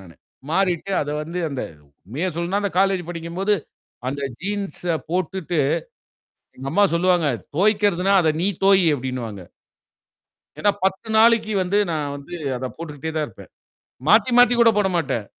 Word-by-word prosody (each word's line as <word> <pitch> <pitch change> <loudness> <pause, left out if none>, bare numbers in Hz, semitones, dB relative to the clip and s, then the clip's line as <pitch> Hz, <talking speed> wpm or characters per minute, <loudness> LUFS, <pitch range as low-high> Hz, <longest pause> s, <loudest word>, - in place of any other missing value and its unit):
நானு. 90 -4 -14 0.4
மாறிட்டு 185 +1 0
அத 145 - -3
வந்து 170 +4 -5
அந்த 135 -2 -3 0.4
உண்மைய 140 - -3
சொல்லனும்னா, 175 +4 -1
அந்த 200 - -1
காலேஜ் 195 -2 +2
படிக்கும்போது, 175 +5 -1 0.5
அந்த 140 +2 -4 0.2
ஜீன்ஸ 200 0 -4 0.3
போட்டுட்டு 180 -1 -2 1.0
எங்க 135 +1 -6
அம்மா 205 +4 +4
சொல்லுவாங்க, 175 -2 +2 0.3
தோய்க்கறதுன்னா, 200 -1 +2
அத 160 -2 +3
நீ 185 - +2 0.2
தோயி! 195 -2 +5
அப்டின்னுவாங்க. 120 -6 -5 1.2
என்னா, 205 - +3
10 190 +3 -1
நாளைக்கு 225 -1 +4
வந்து 190 +3 +1
நான் 150 -3 -2
வந்து 145 +5 -10 0.2
அத 130 - -4
போட்டுக்கிட்டே 160 -1 -6
தான் 155 -1 0
இருப்பேன். 110 - -14 0.6
மாத்தி, 220 +6 +5
மாத்தி 245 0 +7
கூட 230 -1 +7
போடமாட்டேன். 175 - 0
180 Hz, 135 wpm, -22 LUFS, 150-200 Hz, 1.2 s, மாத்தி